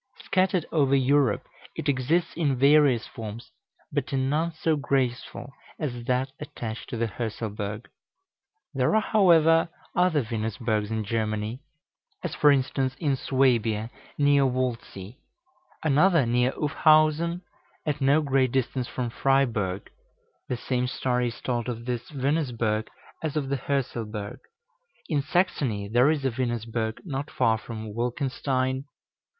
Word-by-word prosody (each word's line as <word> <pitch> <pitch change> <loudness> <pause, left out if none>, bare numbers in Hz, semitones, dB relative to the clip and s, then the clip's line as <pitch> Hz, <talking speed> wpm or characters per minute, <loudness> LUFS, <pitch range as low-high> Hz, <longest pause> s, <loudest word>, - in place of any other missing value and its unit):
Scattered 185 -3 +1
over 140 -4 +3
Europe, 135 -3 +2 0.3
it - - -4
exists 150 +6 +1
in 150 -5 +1
various 140 -3 +5
forms, 115 +1 -8 0.4
but 145 -2 -2
in 135 0 0
none 160 +3 +1
so 160 0 0
graceful 135 -2 -2 0.3
as 120 -6 -4
that 130 +1 0
attached 115 -6 -6
to 120 - -4
the 115 0 0
Hörselberg. 105 -1 -4 0.9
There 135 +8 +2
are, 220 - +4
however, 165 -6 +4 0.3
other 175 -5 +3
Venusbergs 110 -1 -2
in 110 -1 -2
Germany; 110 +2 -2 0.6
as, 180 - -3
for 150 - +4
instance, 135 -1 0
in 145 -5 0
Swabia, 120 -5 +1 0.3
near 145 -1 +4
Waldsee; 125 -4 -3 0.6
another 155 0 +4
near 125 +2 +2
Ufhausen, 155 +3 +3 0.4
at 150 -2 -2
no 140 +3 +4
great 135 -3 +2
distance 130 -1 -1
from 120 -2 -3
Freiburg 115 -9 0 0.6
(the 125 - -1
same 125 +1 -1
story 125 -1 0
is 115 - -6
told 120 -1 -2
of 115 -1 -5
this 125 -1 -3
Venusberg 125 -7 -1 0.3
as 155 -2 -3
of 140 -3 -2
the 140 - 0
Hörselberg); 120 -4 -3 0.7
in 150 -3 +1
Saxony 135 - 0
there 120 +6 +4
is 150 -3 0
a 135 - +2
Venusberg 115 -2 -2
not 145 -2 -4
far 110 -6 +2
from 110 -2 -7
Wolkenstein. 130 +2 -1
130 Hz, 130 wpm, -26 LUFS, 115-145 Hz, 0.9 s, various